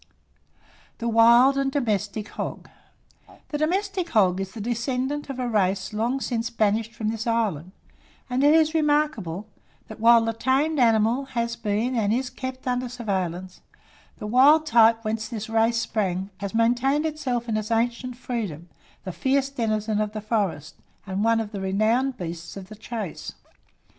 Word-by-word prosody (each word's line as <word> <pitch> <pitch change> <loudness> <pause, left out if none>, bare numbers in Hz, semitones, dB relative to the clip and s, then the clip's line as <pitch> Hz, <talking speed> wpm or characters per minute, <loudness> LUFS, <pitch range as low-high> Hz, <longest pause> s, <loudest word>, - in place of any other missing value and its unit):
THE 235 - -3
WILD 235 +4 +5
AND 270 0 0
DOMESTIC 215 -5 -2
HOG. - - -6 0.8
The 295 - -2
domestic 370 +2 -1
hog 190 -4 +3
is 190 0 -6
the 230 - -8
descendant 250 +6 -2
of 270 - -5
a 250 -1 -2
race 195 -3 0
long 235 +5 0
since 235 -3 -2
banished 225 0 0
from 215 -1 -2
this 225 +1 -4
island; 205 -8 -1 0.6
and 255 +2 0
it 295 +2 +6
is 315 0 +3
remarkable, 290 - 0 0.4
that 220 - -9
while 230 0 +6
the 225 - -1
tamed 270 +6 +1
animal 230 +2 +3
has 235 0 0
been 220 +4 -1
and 210 -3 +1
is 250 +2 -1
kept 260 0 -7
under 250 0 -1
surveillance, 185 -6 -4 0.6
the - - -7
wild 275 +8 +5
type 230 -3 +4
whence 220 0 -2
this 220 -1 -6
race 225 +1 +2
sprung, 195 -4 -2
has 200 +2 -5
maintained 245 +6 +2
itself 255 -6 -2
in 225 - -1
its 215 0 -2
ancient 240 +2 -1
freedom, 200 - -5 0.3
the 185 - -5
fierce 270 +7 0
denizen 215 -4 -1
of 210 0 -2
the 215 - -4
forest, 205 - -2 0.3
and 195 +1 -2
one 230 0 +3
of 215 -2 -4
the 200 -3 -5
renowned 220 +7 +1
beasts 170 0 -7
of 190 -1 -9
the 215 - -9
chase. 220 -4 -6
230 Hz, 165 wpm, -24 LUFS, 210-255 Hz, 0.8 s, it